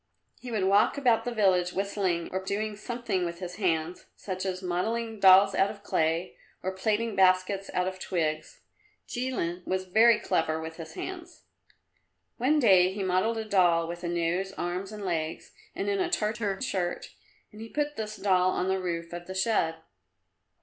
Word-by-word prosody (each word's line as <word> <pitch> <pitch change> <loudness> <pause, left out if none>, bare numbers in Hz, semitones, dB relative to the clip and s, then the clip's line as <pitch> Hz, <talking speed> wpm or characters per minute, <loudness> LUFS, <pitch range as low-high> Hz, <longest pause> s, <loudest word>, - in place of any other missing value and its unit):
He 250 - -8
would 215 -5 -1
walk 200 +7 +3
about 245 -5 +2
the 245 - -2
village 185 -5 +2
whistling, 190 -3 -1
or 190 +1 -3
doing 210 +2 -2
something 235 -4 -3
with 170 -1 -3
his 180 0 -7
hands, 170 -3 -1
such 185 -1 -5
as 185 0 -4
modelling 220 +5 -2
dolls 195 +1 +7
out 195 - +3
of 205 -1 -10
clay, 165 -1 0 0.3
or 190 - -1
plaiting 215 +3 -1
baskets 190 +1 +3
out 180 0 +1
of 185 0 -5
twigs. 155 -4 -3 0.5
Jilin 240 -9 -3
was 185 0 -1
very 220 +4 +5
clever 160 -5 0
with 160 0 -7
his 160 -1 -8
hands. 355 -2 -7 0.9
One 265 +6 +2
day 190 -9 +5
he 195 +1 -4
modelled 185 +5 +1
a 220 - -3
doll 175 -5 +3
with 175 +1 -7
a - - -2
nose, 175 +3 -1
arms 180 +3 -4
and 210 -2 -7
legs 160 -3 -3 0.2
and - - -3
in 400 -1 0
a 360 -2 0
Tartar 210 - -1
shirt, 180 -8 -2 0.4
and 210 0 -12
he 225 - -8
put 295 +2 -2
this 215 -1 -5
doll 185 -2 +2
on 185 0 -1
the 190 0 +1
roof 170 -2 -4
of 175 0 -7
the 190 - -6
shed. 190 -5 +1
190 Hz, 175 wpm, -28 LUFS, 175-215 Hz, 0.9 s, dolls